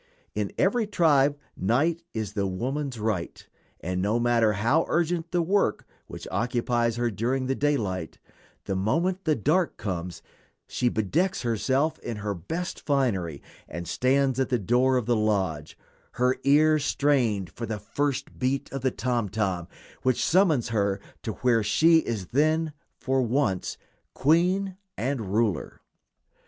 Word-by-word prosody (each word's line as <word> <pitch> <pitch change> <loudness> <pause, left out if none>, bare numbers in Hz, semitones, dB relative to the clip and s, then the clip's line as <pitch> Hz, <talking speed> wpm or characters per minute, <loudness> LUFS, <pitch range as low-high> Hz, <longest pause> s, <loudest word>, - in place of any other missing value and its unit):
In - - -2
every 240 -3 +2
tribe 145 -7 +3 0.2
night 145 - +1
is 110 -4 -4
the 100 -2 0
woman's 130 +6 -3
right, 105 -5 -3 0.3
and 90 +1 -2
no 105 +5 +1
matter 120 -2 +3
how 120 +11 +2
urgent 170 0 0
the 175 0 +1
work 195 +4 +1 0.2
which - - -8
occupies 120 -1 0
her 120 0 0
during 125 +6 -1
the 135 - 0
daylight, 105 - -1 0.5
the 95 - -2
moment 170 - 0
the 155 -2 +3
dark 160 - +1
comes 90 -4 -5 0.4
she 125 - 0
bedecks 155 - 0
herself 130 +6 0
in 115 - -5
her 105 0 -2
best 160 - -5
finery 100 - -1 0.2
and 85 +1 -6
stands 135 0 +1
at 130 - +1
the 125 - +2
door 125 +5 +2
of 125 - -1
the 120 +1 +2
lodge, 95 -9 -1 0.4
her 125 +1 +2
ear 155 +2 +5
strained 125 -10 +1
for 115 - -6
the 110 - -3
first 135 +7 -3
beat 135 +2 -1
of 135 - -3
the 130 - +2
tom 120 -4 -1
tom 95 -4 -1 0.3
which 130 -2 +1
summons 160 - +3
her 100 -3 0 0.2
to 110 - -4
where 120 -3 +4
she 160 +10 +4
is 110 - -4
then, 155 +3 +1 0.2
for 130 0 0
once, 120 -6 0 0.4
queen 180 +6 +2 0.2
and 120 -6 -2
ruler. 110 -2 0
125 Hz, 145 wpm, -26 LUFS, 105-145 Hz, 0.5 s, ear